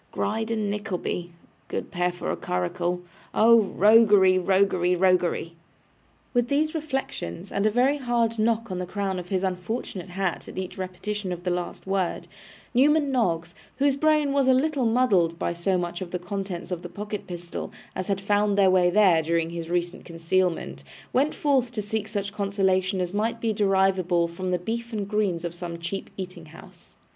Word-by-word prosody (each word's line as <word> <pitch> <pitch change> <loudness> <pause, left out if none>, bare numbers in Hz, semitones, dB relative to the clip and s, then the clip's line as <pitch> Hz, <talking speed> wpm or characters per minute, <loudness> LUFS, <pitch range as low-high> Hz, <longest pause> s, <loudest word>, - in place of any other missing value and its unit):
Gride 220 +1 -2
and 215 -3 -1
Nickleby! 185 -4 -3 0.4
Good - - -4
pair 180 0 0
for 175 - -4
a - - -1
curricle. 170 - -2 0.3
Oh 230 +1 +7
roguery! 205 -2 +5
roguery! 185 -1 +2
roguery!' 180 -2 +2 0.8
With 245 -1 +2
these 300 +4 +1
reflections, 270 - -4
and 200 +2 +1
a - - +4
very 255 +6 +2
hard 235 -3 0
knock 225 0 +1
on 180 - -3
the 180 - -4
crown 195 0 -2
of 180 0 -9
his 190 -1 0
unfortunate 185 0 -3
hat 190 0 -2
at - - -10
each 185 -1 -4
repetition 190 +1 -4
of 175 0 -5
the 180 - 0
last 175 0 -4
word, 190 -2 -1 0.5
Newman 285 +3 +4
Noggs, 175 -9 0 0.2
whose 280 0 +3
brain 305 0 +2
was 275 -2 +2
a 260 - +6
little 275 -2 +1
muddled 200 -9 +3
by 170 - -1
so 180 +2 0
much 175 0 -3
of 185 - -5
the 180 - -2
contents 185 -1 -5
of 175 -2 -3
the 175 - -7
pocket 210 +3 -6
pistol 175 -1 -6 0.2
as 185 - -3
had 195 -1 0
found 205 +1 +1
their 195 -2 +5
way 180 -1 +4
there 185 -4 +5
during 165 +1 0
his 170 -1 -5
recent 175 0 -2
concealment, 170 +1 -1 0.3
went 280 +4 +2
forth 265 -5 +1
to 225 - -3
seek 215 +1 -3
such 200 -2 -3
consolation 195 -2 +1
as 180 0 -2
might 225 +3 -1
be 225 -1 0
derivable 190 -4 +2
from 180 +2 -5
the 180 - +1
beef 230 +6 -4
and 205 -2 -2
greens 200 -5 0
of 170 - -3
some 175 -1 -6
cheap 175 +4 -5
eating 185 -3 -7
house. 160 +3 -15
190 Hz, 180 wpm, -25 LUFS, 175-220 Hz, 0.8 s, Oh